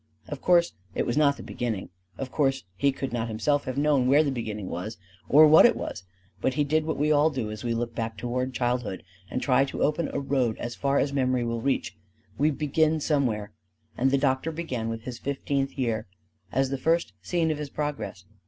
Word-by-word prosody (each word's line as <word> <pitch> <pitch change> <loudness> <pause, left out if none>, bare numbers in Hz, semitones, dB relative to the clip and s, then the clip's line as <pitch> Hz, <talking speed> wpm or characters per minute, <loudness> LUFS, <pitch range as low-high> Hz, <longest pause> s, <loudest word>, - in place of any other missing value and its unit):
Of - - -6
course 175 -1 +4 0.2
it - - 0
was 120 - -1
not 145 -2 +3
the - - -9
beginning; 115 -5 -3 0.3
of 130 -1 -5
course 135 -2 +1
he 140 +7 +2
could 135 -2 -5
not 120 -1 -1
himself 140 +6 0
have 130 0 -4
known 145 -3 +3
where 145 +4 +5
the 140 - 0
beginning 110 -6 -4
was 105 +6 -5 0.3
or 155 +3 +8
what 155 +1 +8
it - - +6
was; 90 - -6 0.4
but 130 - 0
he 150 - +2
did 155 +2 +1
what 160 - -2
we 150 +2 +2
all 150 +1 +5
do 125 -8 -3
as 105 -1 -7
we 120 -1 -1
look 115 0 -2
back 115 -1 -4
toward 125 +3 -2
childhood 120 -5 -2 0.3
and 125 - -3
try 130 -1 +4
to 135 - -3
open 150 +2 +1
a - - -2
road 135 -5 0
as 120 - -4
far 140 +3 0
as 140 0 +1
memory 130 -2 +1
will 115 -1 -2
reach, 135 -5 -1 0.4
we 150 +2 +4
begin 155 +2 +1
somewhere, 125 -9 0 0.4
and 130 +2 +2
the 140 - +3
doctor 135 +3 +1
began 130 -9 -3
with 115 0 -5
his 120 -1 -6
fifteenth 140 0 -2
year 115 -5 -1 0.4
as 135 0 +1
the 135 - -2
first 165 - +1
scene 165 - 0
of 150 - -3
his 150 -2 -4
Progress. 145 -10 -4
135 Hz, 215 wpm, -27 LUFS, 120-145 Hz, 0.4 s, or